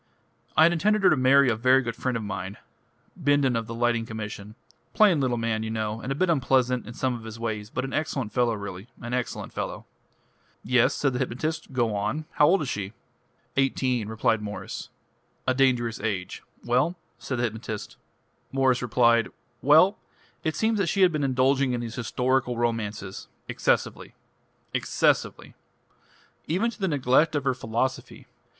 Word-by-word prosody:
"I 155 Hz, -, +8 dB
had 170 Hz, +1 st, +5 dB
intended 205 Hz, +5 st, +1 dB
her -, -, +6 dB
to -, -, +5 dB
marry 135 Hz, +1 st, +5 dB
a 120 Hz, -, +2 dB
very 130 Hz, +4 st, +4 dB
good 115 Hz, -2 st, -4 dB
friend 125 Hz, -1 st, -1 dB
of 115 Hz, -, -5 dB
mine 95 Hz, -1 st, -5 dB, 0.6 s
Bindon 145 Hz, -6 st, +2 dB
of 115 Hz, -1 st, -2 dB
the 115 Hz, -, -6 dB
Lighting 120 Hz, -1 st, +1 dB
Commission 105 Hz, -1 st, -7 dB, 0.4 s
plain 195 Hz, -9 st, +5 dB
little 125 Hz, -2 st, 0 dB
man, 115 Hz, -1 st, -1 dB
you 110 Hz, -, -3 dB
know, 110 Hz, 0 st, -3 dB
and 130 Hz, -, -4 dB
a -, -, 0 dB
bit 185 Hz, +6 st, +1 dB
unpleasant 125 Hz, -5 st, +1 dB
in 115 Hz, -, -8 dB
some 130 Hz, -1 st, 0 dB
of 120 Hz, -2 st, -7 dB
his 110 Hz, 0 st, -8 dB
ways, 110 Hz, -2 st, -3 dB
but 130 Hz, +3 st, -3 dB
an 135 Hz, -, -6 dB
excellent 135 Hz, -8 st, -2 dB
fellow 120 Hz, -2 st, +2 dB
really 100 Hz, 0 st, -7 dB
an 120 Hz, +1 st, -6 dB
excellent 125 Hz, -1 st, -3 dB
fellow." -, -, -5 dB, 0.8 s
"Yes," 125 Hz, +2 st, +3 dB
said 135 Hz, -3 st, 0 dB
the 125 Hz, -, -2 dB
hypnotist, 155 Hz, +6 st, -3 dB
"go 120 Hz, -5 st, 0 dB
on. 130 Hz, +10 st, -2 dB
How 150 Hz, -, +4 dB
old 180 Hz, +1 st, +3 dB
is -, -, -4 dB
she?" 100 Hz, -2 st, -4 dB, 0.6 s
"Eighteen." 130 Hz, -4 st, +1 dB
"A 110 Hz, +3 st, -4 dB
dangerous 125 Hz, -4 st, +1 dB
age. 95 Hz, -3 st, -3 dB, 0.2 s
Well?" 125 Hz, +9 st, +2 dB, 1.6 s
"Well: 125 Hz, -, +3 dB, 0.4 s
it 155 Hz, -, -1 dB
seems 220 Hz, -1 st, +1 dB
that 190 Hz, -, +1 dB
she 195 Hz, -, 0 dB
has 180 Hz, -, +5 dB
been 150 Hz, -2 st, -1 dB
indulging 130 Hz, 0 st, +2 dB
in 120 Hz, -, -2 dB
these 115 Hz, -1 st, -5 dB
historical 125 Hz, 0 st, 0 dB
romances 110 Hz, -4 st, -3 dB, 0.2 s
excessively. -, -, -1 dB, 0.6 s
Excessively. -, -, 0 dB, 0.9 s
Even 200 Hz, +9 st, +1 dB
to -, -, -14 dB
the 195 Hz, -, 0 dB
neglect 145 Hz, +1 st, +2 dB
of 145 Hz, -, 0 dB
her 135 Hz, -2 st, +1 dB
philosophy. 125 Hz, +2 st, -3 dB
125 Hz, 155 wpm, -26 LUFS, 115-140 Hz, 1.6 s, I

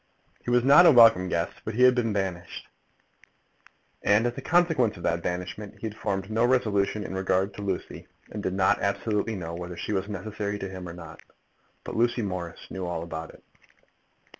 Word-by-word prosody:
He -, -, -5 dB
was 120 Hz, 0 st, +3 dB
not 145 Hz, +7 st, +8 dB
a -, -, +9 dB
welcome 115 Hz, -8 st, +6 dB
guest, 85 Hz, 0 st, -2 dB
but 110 Hz, -, -5 dB
had 125 Hz, +1 st, +6 dB
been 120 Hz, -3 st, 0 dB
banished; 95 Hz, -4 st, -4 dB, 1.4 s
and, 105 Hz, +3 st, +3 dB
as 120 Hz, 0 st, -1 dB
a -, -, -6 dB
consequence 160 Hz, -, +2 dB
of 85 Hz, -, -11 dB
that 85 Hz, 0 st, 0 dB
banishment, 90 Hz, +4 st, -5 dB
he -, -, -7 dB
had 110 Hz, -1 st, -5 dB
formed 95 Hz, -1 st, -3 dB
no 115 Hz, +2 st, +1 dB
resolution 105 Hz, -5 st, +1 dB
in -, -, -6 dB
regard 95 Hz, +1 st, 0 dB
to -, -, -8 dB
Lucy, 95 Hz, -2 st, -4 dB, 0.2 s
and 105 Hz, -, -5 dB
did 95 Hz, -, -2 dB
not 95 Hz, -1 st, +2 dB
absolutely 105 Hz, +2 st, -1 dB
know 85 Hz, -3 st, -6 dB
whether 90 Hz, 0 st, -7 dB
she 105 Hz, -, -3 dB
was 100 Hz, +1 st, -2 dB
necessary 105 Hz, +1 st, -4 dB
to 95 Hz, -, -5 dB
him 95 Hz, -2 st, -7 dB
or -, -, -8 dB
not. 85 Hz, -2 st, -11 dB, 0.6 s
But -, -, -6 dB
Lucy 120 Hz, 0 st, +1 dB
Morris 90 Hz, -4 st, -6 dB
knew 95 Hz, -1 st, -4 dB
all 85 Hz, -1 st, -3 dB
about 80 Hz, -1 st, -6 dB
it. -, -, -20 dB
100 Hz, 190 wpm, -26 LUFS, 90-115 Hz, 1.4 s, a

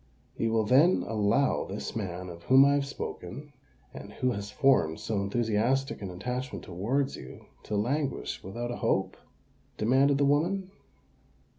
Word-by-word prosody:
"You 115 Hz, -, 0 dB
will 110 Hz, -1 st, +2 dB
then 140 Hz, -, +4 dB
allow 110 Hz, +5 st, +1 dB
this -, -, -6 dB
man 90 Hz, -4 st, -4 dB
of 85 Hz, -1 st, -10 dB
whom 135 Hz, +1 st, +7 dB
I 140 Hz, -, +4 dB
have 140 Hz, -1 st, 0 dB
spoken, 140 Hz, +1 st, -7 dB, 0.4 s
and -, -, -9 dB
who 125 Hz, -, 0 dB
has 100 Hz, -3 st, -4 dB
formed 105 Hz, -, +2 dB
so 105 Hz, -3 st, -2 dB
enthusiastic 115 Hz, +6 st, 0 dB
an 100 Hz, -, -4 dB
attachment 125 Hz, +8 st, -5 dB
towards 120 Hz, +11 st, -1 dB
you, 65 Hz, -, -11 dB, 0.2 s
to 105 Hz, -, -3 dB
languish 135 Hz, +7 st, -1 dB
without 120 Hz, +6 st, -5 dB
a 120 Hz, -, -4 dB
hope?" -, -, 0 dB, 0.6 s
demanded 135 Hz, +5 st, +3 dB
the 140 Hz, -, +3 dB
woman. 180 Hz, +7 st, +1 dB
120 Hz, 150 wpm, -29 LUFS, 100-140 Hz, 0.6 s, whom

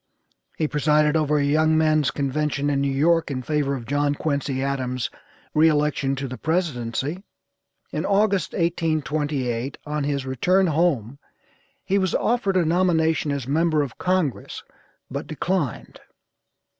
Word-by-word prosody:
He 155 Hz, -, +1 dB
presided 150 Hz, +1 st, +2 dB
over 150 Hz, -1 st, +2 dB
a 145 Hz, -, +2 dB
young 155 Hz, +2 st, +3 dB
men's 155 Hz, -2 st, +3 dB
convention 145 Hz, 0 st, -1 dB
in 140 Hz, -1 st, +1 dB
New 140 Hz, 0 st, 0 dB
York 165 Hz, +5 st, +2 dB
in 130 Hz, -2 st, -3 dB
favor 145 Hz, -1 st, 0 dB
of 120 Hz, -3 st, -7 dB
John 145 Hz, +3 st, 0 dB
Quincy 140 Hz, -3 st, -2 dB
Adams' 130 Hz, -3 st, -2 dB, 0.4 s
re 155 Hz, +1 st, +5 dB
election 145 Hz, -2 st, +1 dB
to 135 Hz, 0 st, -4 dB
the 130 Hz, 0 st, -7 dB
presidency. 155 Hz, -2 st, -2 dB, 0.7 s
In -, -, -2 dB
August, 200 Hz, -3 st, +1 dB
1828, 150 Hz, -6 st, -1 dB
on 150 Hz, 0 st, -2 dB
his 140 Hz, -2 st, -1 dB
return 180 Hz, +9 st, +2 dB
home 145 Hz, -, 0 dB, 0.6 s
he 200 Hz, +1 st, +1 dB
was 185 Hz, -2 st, 0 dB
offered 210 Hz, -5 st, +1 dB
a 175 Hz, -, +3 dB
nomination 160 Hz, -3 st, +2 dB
as 140 Hz, -3 st, -3 dB
member 155 Hz, +1 st, +2 dB
of 130 Hz, -5 st, -8 dB
Congress 180 Hz, -7 st, -1 dB, 0.5 s
but 140 Hz, +2 st, -4 dB
declined. 155 Hz, -, -3 dB
150 Hz, 140 wpm, -23 LUFS, 140-165 Hz, 0.7 s, re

